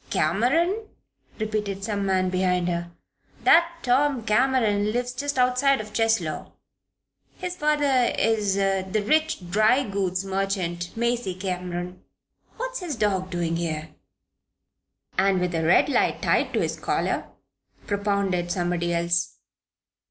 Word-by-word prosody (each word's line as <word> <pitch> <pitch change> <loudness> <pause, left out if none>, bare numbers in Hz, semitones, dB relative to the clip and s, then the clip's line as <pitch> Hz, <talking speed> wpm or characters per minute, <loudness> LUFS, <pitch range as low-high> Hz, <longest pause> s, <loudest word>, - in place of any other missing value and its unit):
'" - - -27
"Cameron?" 330 - +1 0.5
repeated 210 -3 -3
some 200 -2 -2
man 185 -1 +1
behind 180 -1 +1
her. 170 -1 -2 0.5
"That 335 +1 +5
Tom 260 0 +2
Cameron 215 -3 +2
lives 245 +2 -1
just 285 +1 -3
outside 255 +2 +3
of 215 0 -7
Cheslow. 225 -9 0 0.8
His 360 -1 -4
father 290 -6 +2
is 210 -3 +1
the 195 +1 0
rich 310 - +1
dry 215 +7 +4
goods 195 -2 -1
merchant, 190 -2 -2
Macy 235 -5 -1
Cameron. 180 -1 -5 0.5
What's - - -4
his 345 -6 -4
dog 195 -4 0
doing 170 -2 -1
here?" 160 -2 -3 1.3
"And 195 -1 +3
with 180 0 -1
a 165 -1 0
red 165 +3 +4
light 285 - +1
tied - - +2
to - - +1
his - - -2
collar?" - - -1 0.6
propounded 200 -4 -1
somebody 175 -1 -1
else. 170 0 0
200 Hz, 125 wpm, -25 LUFS, 180-250 Hz, 1.3 s, That